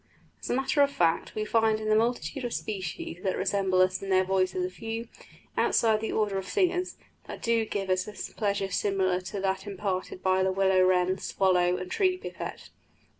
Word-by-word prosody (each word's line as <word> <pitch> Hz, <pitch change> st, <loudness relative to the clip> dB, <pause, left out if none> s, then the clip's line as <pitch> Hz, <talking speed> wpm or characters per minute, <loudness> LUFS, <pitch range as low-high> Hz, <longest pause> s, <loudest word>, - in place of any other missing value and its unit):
As -, -, -6 dB
a -, -, +1 dB
matter 270 Hz, +2 st, +1 dB
of 280 Hz, -, +5 dB
fact, 170 Hz, -10 st, 0 dB
we 215 Hz, 0 st, -1 dB
find 220 Hz, 0 st, +2 dB
in 215 Hz, -, -4 dB
the 215 Hz, -, +4 dB
multitude 245 Hz, +4 st, 0 dB
of 240 Hz, -, -3 dB
species 185 Hz, -4 st, -5 dB
that 190 Hz, -1 st, -1 dB
resemble 190 Hz, -1 st, +1 dB
us 185 Hz, 0 st, 0 dB
in 195 Hz, -, -6 dB
their 185 Hz, 0 st, +4 dB
voices 190 Hz, -, 0 dB
a -, -, -3 dB
few, 225 Hz, -2 st, -5 dB, 0.5 s
outside 225 Hz, -1 st, +3 dB
of 215 Hz, -, 0 dB
the 220 Hz, -, -2 dB
order 205 Hz, -3 st, 0 dB
of 190 Hz, -, -7 dB
singers, 365 Hz, -2 st, 0 dB, 0.3 s
that -, -, -8 dB
do 230 Hz, -1 st, +2 dB
give 200 Hz, -2 st, -3 dB
us 185 Hz, +1 st, +1 dB
a 210 Hz, -, -7 dB
pleasure 200 Hz, -2 st, -1 dB
similar 185 Hz, -2 st, +1 dB
to 190 Hz, +2 st, -5 dB
that 190 Hz, 0 st, -1 dB
imparted 190 Hz, -2 st, -3 dB
by 185 Hz, 0 st, +3 dB
the 190 Hz, 0 st, +2 dB
willow 190 Hz, 0 st, +3 dB
wren, 185 Hz, 0 st, +2 dB
swallow, 180 Hz, -2 st, +2 dB
and 185 Hz, 0 st, -6 dB
tree 370 Hz, -2 st, +2 dB
pipit. -, -, -7 dB
195 Hz, 200 wpm, -28 LUFS, 185-225 Hz, 0.5 s, of